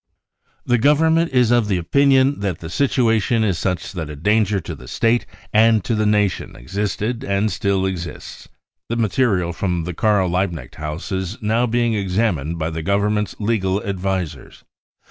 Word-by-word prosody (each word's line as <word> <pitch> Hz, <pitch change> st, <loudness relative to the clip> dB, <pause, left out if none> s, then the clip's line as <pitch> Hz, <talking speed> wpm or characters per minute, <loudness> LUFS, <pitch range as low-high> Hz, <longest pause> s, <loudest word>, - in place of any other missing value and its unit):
" -, -, -43 dB
The 120 Hz, -, +4 dB
Government 160 Hz, +5 st, +3 dB
is 125 Hz, -3 st, +3 dB
of 120 Hz, -3 st, +3 dB
the 100 Hz, -3 st, +1 dB
opinion 135 Hz, +8 st, +3 dB
that 100 Hz, -5 st, -2 dB
the 80 Hz, 0 st, -8 dB
situation 115 Hz, -3 st, +2 dB
is 95 Hz, -6 st, 0 dB
such 90 Hz, +1 st, -2 dB
that 80 Hz, -5 st, -5 dB
a 75 Hz, -, -6 dB
danger 105 Hz, +5 st, +1 dB
to -, -, -7 dB
the -, -, -12 dB
State 115 Hz, +1 st, +1 dB, 0.3 s
and 110 Hz, -1 st, +4 dB
to 105 Hz, -, -1 dB
the 110 Hz, -1 st, +1 dB
Nation 105 Hz, -3 st, 0 dB
existed 105 Hz, -, -3 dB
and 105 Hz, -2 st, 0 dB
still 95 Hz, +1 st, 0 dB
exists. 85 Hz, -4 st, -6 dB, 0.4 s
The 115 Hz, -, -1 dB
material 105 Hz, -6 st, +1 dB
from 90 Hz, -3 st, -2 dB
the 90 Hz, +2 st, -4 dB
Karl 105 Hz, -1 st, +2 dB
Liebknecht 85 Hz, -7 st, -2 dB
house 75 Hz, +6 st, -5 dB
is 95 Hz, +3 st, -3 dB
now 115 Hz, +2 st, +1 dB
being 120 Hz, 0 st, +1 dB
examined 95 Hz, -6 st, -1 dB
by 80 Hz, 0 st, -2 dB
the 80 Hz, 0 st, -4 dB
Government's 105 Hz, +4 st, 0 dB
legal 100 Hz, -3 st, 0 dB
advisers. 95 Hz, -7 st, -4 dB
100 Hz, 165 wpm, -20 LUFS, 90-115 Hz, 0.4 s, The